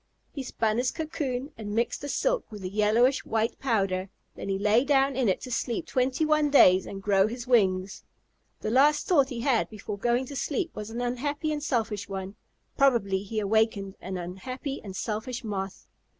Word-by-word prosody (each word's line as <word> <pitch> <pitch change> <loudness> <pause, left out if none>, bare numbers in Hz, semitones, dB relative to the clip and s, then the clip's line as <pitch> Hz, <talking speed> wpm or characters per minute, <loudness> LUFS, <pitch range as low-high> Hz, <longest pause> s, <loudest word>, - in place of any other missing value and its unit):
He 280 - -4
spun 225 -3 -1
his 250 0 +1
cocoon 285 -4 -3
and 205 -1 -4
mixed 235 +1 0
the 285 - -5
silk - - 0
with 210 -2 -8
a 185 - -3
yellowish 215 +6 +3
white 225 0 -1
powder, 195 -7 0 0.2
then - - -7
he 195 - 0
lay 210 +4 +3
down 275 -1 +3
in 250 -5 +2
it 185 - 0
to 255 - -7
sleep 235 0 -2
twenty 260 +4 0
one 305 -1 +3
days 185 -10 +6
and 195 0 -7
grow 195 -1 +4
his 240 +2 -6
wings. 195 -6 +2 0.6
The 215 - -2
last 295 +4 +4
thought 280 -7 +3
he 240 -4 -4
had 255 -3 +2
before 210 -1 -7
going 240 +4 +1
to 280 - -8
sleep 305 +6 -2
was 210 0 -6
an 235 +2 -4
unhappy 285 +5 -2
and 300 -1 -2
selfish 220 -7 -1
one. 195 0 -5 0.4
Probably 230 -9 +3
he 215 +2 -3
awakened 210 -1 +1
an 185 0 -4
unhappy 255 - -5
and 195 -3 -8
selfish 240 +5 -3
Moth. 195 -3 -4
230 Hz, 190 wpm, -27 LUFS, 200-270 Hz, 0.6 s, days